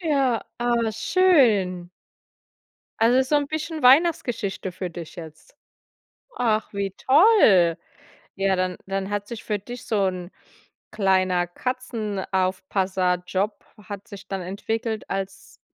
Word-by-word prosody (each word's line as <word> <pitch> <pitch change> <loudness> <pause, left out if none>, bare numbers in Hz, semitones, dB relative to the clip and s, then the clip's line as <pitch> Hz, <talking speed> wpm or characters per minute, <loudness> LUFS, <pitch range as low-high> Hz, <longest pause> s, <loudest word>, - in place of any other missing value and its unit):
Ja, 275 -8 +1 0.2
aber 235 -1 +1
schön. 225 - +3 1.1
Also 240 +3 +5
so 260 +3 0
'n 290 -1 +1
bisschen 315 0 -4
Weihnachtsgeschichte 250 - +3
für 180 0 -5
dich 170 -1 -9
jetzt. 160 -3 -11 0.8
Ach, 220 -3 0
wie 200 -1 -2
toll. 260 - +5 0.6
Ja, 195 0 +1
dann 185 -1 -1
dann 195 0 -3
hat 205 0 -3
sich 235 -2 -7
für 210 -2 -1
dich 240 +5 -9
so 205 -3 +1
'n 180 -1 -4 0.6
kleiner 185 -4 +2
Katzenaufpasserjob 190 -4 -2 0.2
hat 200 +1 -8
sich 200 -2 -11
dann 195 -1 -3
entwickelt 220 +4 -4
als 195 0 -6
200 Hz, 115 wpm, -24 LUFS, 185-245 Hz, 1.1 s, Also